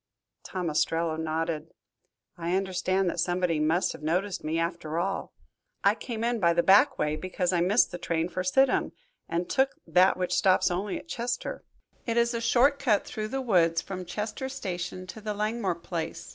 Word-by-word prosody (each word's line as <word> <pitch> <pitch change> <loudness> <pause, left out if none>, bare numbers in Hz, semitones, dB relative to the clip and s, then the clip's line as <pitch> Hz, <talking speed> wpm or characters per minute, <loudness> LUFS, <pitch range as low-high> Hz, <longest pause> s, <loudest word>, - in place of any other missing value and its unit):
Tom 180 -2 -4
Ostrello 165 +1 +1
nodded. 160 0 -3 0.6
"I 175 +1 -1
understand 190 0 0
that 170 - -6
somebody 175 -1 +1
must 160 +4 +2
have - - -11
noticed 180 +5 -1
me 155 +1 -1
after 165 -1 -2
all. 195 +3 -2 0.5
I - - +5
came 230 -2 -5
in 235 0 0
by 170 -3 +4
the 170 0 +2
back 210 +9 +5
way 150 0 0
because 180 +2 -2
I 175 - +2
missed 200 +7 +3
the 175 - -6
train 165 -1 -1
for 180 +1 -3
Sidham, 265 +9 +2 0.4
and 175 +1 -1
took 265 +3 +1
that 180 +3 +4
which 180 -1 -1
stops 185 0 +3
only 190 +3 -2
at - - -11
Chester. 245 -4 -3 0.4
It 230 0 0
is 235 0 +3
a 230 - -2
short 255 +5 +3
cut 220 -7 +2
through 215 -1 -4
the 265 +4 -3
woods 170 -9 +3
from 185 +2 -6
Chester 215 +8 -4
Station 185 -7 -5
to 200 +4 -9
the 210 0 -3
Langmore 210 -3 -1
place. 165 -1 -5
185 Hz, 185 wpm, -28 LUFS, 170-215 Hz, 0.6 s, I